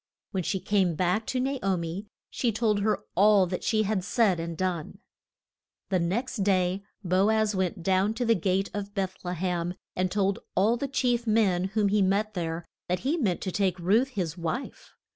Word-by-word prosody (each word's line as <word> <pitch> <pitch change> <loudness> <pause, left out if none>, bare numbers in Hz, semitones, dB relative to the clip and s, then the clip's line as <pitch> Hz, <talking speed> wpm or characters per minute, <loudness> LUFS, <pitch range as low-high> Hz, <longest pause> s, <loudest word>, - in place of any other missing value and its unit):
When 190 - -1
she 190 +3 -1
came 190 -4 +1
back 185 +6 0
to 255 - -1
Na 270 +1 -1
o 195 -2 +1
mi 170 +5 -5 0.2
she 240 - 0
told 215 -1 +1
her 210 +1 0
all 200 +1 +5
that 180 0 -4
she 215 -2 +2
had 205 -2 -1
said 195 -2 +2
and 165 0 -4
done. 180 -4 -2 0.9
The 190 -2 +2
next 230 +10 -1
day 190 -1 +1 0.2
Bo 185 +3 +3
az 220 -1 +2
went 185 -1 -1
down 190 +4 +2
to 245 +1 -1
the 230 - +5
gate 190 0 0
of 205 0 -5
Beth 190 -2 -1
le 180 0 -3
hem, 175 0 -2 0.2
and 185 0 0
told 195 0 0 0.2
all 210 +5 +3
the 275 +4 -3
chief 245 -3 0
men 200 -5 +3
whom 205 +1 +1
he 205 +1 +2
met 200 +3 +1
there 165 -2 -3 0.2
that 180 0 0
he 285 +5 +1
meant 210 - 0
to 195 +2 -2
make 185 -1 +1
Ruth 205 +9 +3
his 185 - -3
wife. 175 +9 -5
195 Hz, 200 wpm, -27 LUFS, 180-215 Hz, 0.9 s, all